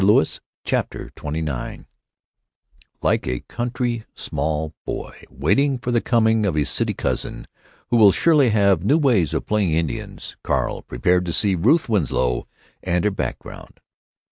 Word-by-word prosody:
CHAPTER - - -2
XXIX 75 -3 -4 1.2
ike - - +1
a 60 -1 -2
country 120 -1 -3
small 80 0 -2
boy - - -5
waiting 130 - +1
for 125 0 -3
the 120 -1 +2
coming 110 -2 +2
of 95 -6 0
his 75 -2 +1
city - - 0
cousin, - - -3 0.5
who 120 - +4
will 105 -3 +8
surely 150 - +4
have 100 -5 +3
new 140 +10 +4
ways 120 - +2
of - - -2
playing 105 -6 +1
Indians, 80 -5 -3
Carl - - -1
prepared 90 +8 0
to 85 - -1
see 100 +1 +2
Ruth 150 - +3
Winslow 75 - 0 0.3
and 90 -1 0
her 105 - +3
background. 95 - -6
100 Hz, 140 wpm, -22 LUFS, 80-120 Hz, 1.2 s, will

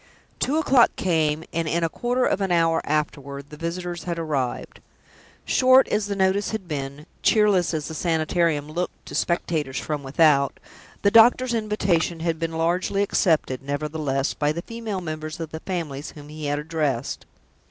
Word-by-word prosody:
Two 290 +4 +1
o'clock 270 -6 +5
came; 160 -3 +1
and 165 0 -1
in 170 +2 0
a - - +3
quarter 245 +9 0
of 200 - 0
an 190 -2 0
hour 165 -1 +3
afterward 140 -2 -3
the - - -8
visitors 170 +2 -4
had 170 -1 -2
arrived. 145 -6 -3 0.7
Short 260 +1 +5
as 210 -1 0
the 200 - -2
notice 190 +1 +1
had 215 -5 -5
been, 140 -1 -5 0.2
cheerless 205 -5 +3
as 155 -3 -3
the 160 - -6
Sanitarium 160 -2 0
looked 170 +4 -4
to - - -10
spectators 155 -6 -1
from 150 -2 -3
without, 140 0 +3 0.4
the 200 - +4
doctor's 240 +3 +6
invitation 190 -7 0
had 165 -1 -1
been 165 -1 -2
largely 180 +5 +1
accepted, 160 -9 +1
nevertheless, 145 -1 -2
by 145 0 0
the 170 +3 -4
female 225 -4 -5
members 155 0 -5
of 165 -2 -5
the 160 - -5
families 160 -6 -4
whom 145 -1 -11
he 155 0 -7
had 145 0 0
addressed. 150 -5 -2
165 Hz, 165 wpm, -24 LUFS, 150-190 Hz, 0.7 s, doctor's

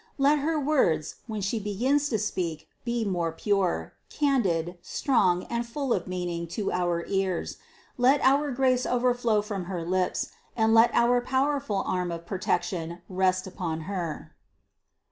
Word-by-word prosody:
Let 285 +2 +4
her 310 +2 0
words, 255 - +1
when 215 -2 -4
she 200 +4 -1
begins 255 +9 +1
to 220 - +1
speak, 170 -6 -3 0.2
be 235 -2 -1
most 170 -4 -1
pure, 195 -4 0 0.2
candid, 185 - 0
strong 185 - +1
and 235 0 -2
full 250 +2 -2
of 180 - -2
meaning 175 -2 -3
to 210 - -1
our 175 -1 0
ears; 190 -3 -1 0.4
let 265 +4 +5
our 280 +2 +3
grace 255 -1 +2
overflow 245 -3 +2
from 200 -4 -4
her 175 -2 -4
lips, 185 +1 0 0.3
and 220 0 +3
let 225 +1 +7
our 245 +1 +4
powerful 260 -5 0
arm 180 -1 -1
of 170 0 -6
protection 175 -2 -2
rest 185 0 +1
upon 170 -4 -4
her." 170 -3 -5
200 Hz, 145 wpm, -27 LUFS, 175-245 Hz, 0.4 s, let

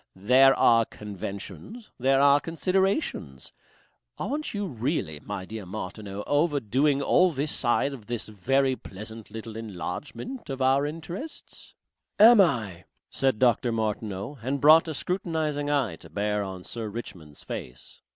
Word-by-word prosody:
There 130 +8 +5
are 115 -1 +5
conventions, 105 - -8
there 135 +2 +3
are 140 +1 +6
considerations.... 180 - -1 0.6
Aren't 295 +4 -3
you 205 -1 -3
really, 120 - -2
my 95 +4 -6
dear 110 +1 -7
Martineau, 100 +1 -6
overdoing 145 -2 +1
all 180 +4 +4
this 145 0 -2
side 135 +3 +1
of 115 -6 -11
this 120 -2 -3
very 130 +6 +1
pleasant 110 +1 -9
little 110 0 -8
enlargement 115 - -6
of 135 -1 -4
our 135 +2 +3
interests." 165 - -8 0.4
"AM 225 0 +9
I?" 105 - 0 0.3
said 135 -4 +1
Dr. 120 0 +3
Martineau 110 +2 -3
and 135 +4 -2
brought 155 +4 +7
a 160 - -4
scrutinizing 155 -5 -2
eye 130 - 0
to - - -15
bear 105 0 -1
on 95 -2 -7
Sir 115 +1 -5
Richmond's 90 -9 -9
face. 60 0 -8
125 Hz, 135 wpm, -26 LUFS, 105-150 Hz, 0.6 s, AM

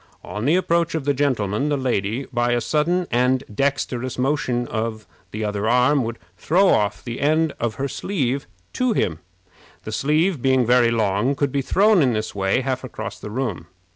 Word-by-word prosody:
On 105 +3 -5
the 155 +5 +4
approach 170 -2 +1
of 155 -4 -3
the 145 - +2
gentleman, 130 -3 0
the 145 - +1
lady, 125 -1 -1
by 120 0 +1
a 120 - +2
sudden 170 +6 +1
and 125 +2 +2
dexterous 130 0 -1
motion 125 -2 0
other 110 -1 -4
arm, 125 +3 +3
would 115 +1 -4 0.2
throw 185 - +3
off 105 -1 +1
the 120 -1 -5
end 155 +1 +2
of 115 -2 -2
her 140 - -2
sleeve 140 -5 -2 0.3
to 255 -2 +1
him. 80 - -1 0.6
The - - -6
sleeve, 155 +2 +1
being 130 -1 +3
very 120 0 +4
long, 110 +3 +1
could 140 0 0
be 140 - 0
thrown 200 +6 +4
in 130 -4 +3
this 110 0 -3
way 95 +5 +1
half 130 0 -2
across 110 -3 -7
the - - -7
room. 105 -7 -3
130 Hz, 175 wpm, -22 LUFS, 115-145 Hz, 0.6 s, the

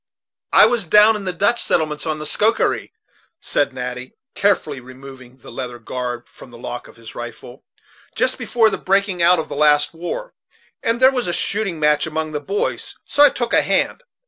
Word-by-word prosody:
"I - - +7
was 225 -3 +1
down 210 +5 +6
in 205 -2 -6
the 185 - -1
Dutch 205 +7 +1
settlements 155 -1 -1
on 155 -1 -1
the 150 - -6
Schoharie," 220 +8 +1 0.5
said 145 - 0
Natty, 125 0 -6 0.2
carefully 180 -8 0
removing 130 0 -13
the 130 - -13
leather 125 -2 -6
guard 120 +1 -5
from - - -15
the 120 - -13
lock 120 +1 -7
of - - -16
his 115 -1 -12
rifle, 120 +2 -9 0.5
"just - - 0
before 225 -3 +2
the - - -3
breaking 195 -1 0
out 175 +1 +5
of 160 - -3
the - - -6
last 150 0 +3
war, 175 - -6 0.5
and 230 +1 0
there 260 +1 +6
was 250 -5 -2
a 175 - -1
shooting 195 -5 -1
match 150 0 +2
among 160 0 -3
the 150 - -3
boys; 420 - -3
so 290 - 0
I 290 - +9
took 240 -3 -3
a - - +5
hand. - - 0
160 Hz, 195 wpm, -20 LUFS, 130-210 Hz, 0.5 s, I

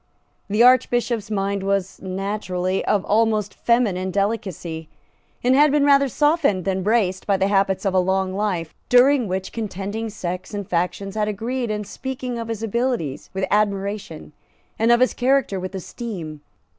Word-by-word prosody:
The 210 +3 +4
Archbishop's 240 -3 +3
mind 200 -1 -1
was 195 -1 -1
naturally 190 -1 -2
of 205 -2 +1
almost 215 -2 +1
feminine 205 -6 +1
delicacy, 190 -6 -3 0.5
and 250 +1 +4
had 290 +2 +5
been 290 0 +3
rather 280 -1 +5
softened 290 - +2
than 190 -1 0
braced 190 -2 +1
by 200 -2 +3
the 195 +1 +1
habits 195 -1 +1
of 195 - +1
a 185 - +4
long 190 +1 0
life, 190 -5 -2 0.2
during 250 0 +5
which 190 0 -3
contending 215 0 -4
sects 185 -1 -5
and 205 -2 -4
factions 180 +3 -2
had 210 -1 0
agreed 235 +4 -2
in 210 0 -2
speaking 250 +3 -5
of 230 - -5
his 225 -1 -4
abilities 225 - -2
with 190 0 0
admiration 200 -6 -1 0.5
and 225 +2 +4
of 240 +1 +4
his 255 - +3
character 255 -6 +1
with 185 +1 -6
esteem. 180 - -6
205 Hz, 155 wpm, -22 LUFS, 190-235 Hz, 0.5 s, had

